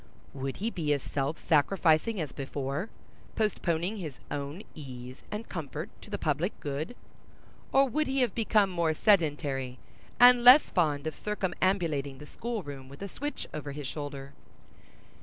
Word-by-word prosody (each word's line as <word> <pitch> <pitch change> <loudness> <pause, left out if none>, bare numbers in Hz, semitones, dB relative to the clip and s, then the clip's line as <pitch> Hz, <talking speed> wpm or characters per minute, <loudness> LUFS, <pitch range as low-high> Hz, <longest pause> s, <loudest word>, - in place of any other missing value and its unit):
Would 135 -1 -4
he 225 +4 -1
be 155 -7 0
as 140 - -2
self 140 +3 -2
sacrificing 170 +5 +3
as 150 -5 -3
before, 140 - -3 0.5
postponing 185 -2 0
his 155 -8 -6
own 145 +7 -4
ease 130 -3 -9
and 210 +2 -5
comfort 160 +2 -5
to - - -12
the 205 - -2
public 160 +5 -1
good, 145 - -4 0.8
or 275 0 +5
would 305 +5 0
he 265 0 +1
have 245 -5 +2
become 215 -3 +3
more 170 -3 +1
sedentary, 145 - +2 0.4
and 245 0 +8
less 255 +5 +9
fond 150 -5 +1
of 155 - -2
circumambulating 175 -8 -1
the 150 - -10
school 230 +5 -4
room 135 -3 -8
with 140 +8 -9
a - - -3
switch 290 +9 -5
over 145 -2 -5
his 145 0 -6
shoulder? 140 -1 -6
160 Hz, 155 wpm, -29 LUFS, 140-210 Hz, 0.8 s, less